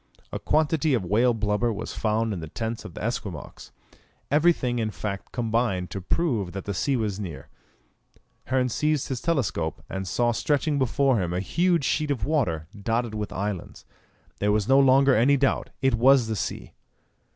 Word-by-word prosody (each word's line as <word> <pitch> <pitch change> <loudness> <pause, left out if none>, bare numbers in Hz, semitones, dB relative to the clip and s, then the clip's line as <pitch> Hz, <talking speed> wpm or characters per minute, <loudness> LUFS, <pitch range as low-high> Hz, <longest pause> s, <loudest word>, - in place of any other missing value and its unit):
A - - -4
quantity 155 -2 +2
of 105 -7 -2
whale 115 +6 +3
blubber 105 +2 0
was 110 0 -5
found 110 0 0
in 95 - -4
the 80 - -6
tents 115 +7 -4
of - - -9
the - - -6
Esquimaux. 100 -8 -5 0.6
Everything 145 -6 +2
in 110 -1 0
fact 100 -2 -5
combined 115 -6 -1
to 95 - -4
prove 105 - -1
that 100 - -6
the 100 - -2
sea 135 +8 0
was 105 -4 -2
near. 80 -9 -7 1.0
Hearn 130 -1 +1
seized 150 +3 0
his 130 -3 -3
telescope, 125 - -1
and 95 0 -5
saw 120 +9 +1
stretching 145 +4 0
before 130 -2 +2
him 85 -1 -2
a - - 0
huge 170 - +1
sheet 150 -1 0
of 140 -5 -1
water, 110 - 0
dotted 115 +2 -1
with 105 -1 -4
islands. 100 -2 -5 0.5
There 105 0 +2
was 105 -1 +1
no 135 +1 +6
longer 135 0 +5
any 135 +6 +4
doubt; 135 0 0
it 135 - +3
was 125 +2 +5
the 110 0 -2
sea! - - -4
115 Hz, 175 wpm, -25 LUFS, 100-135 Hz, 1.0 s, no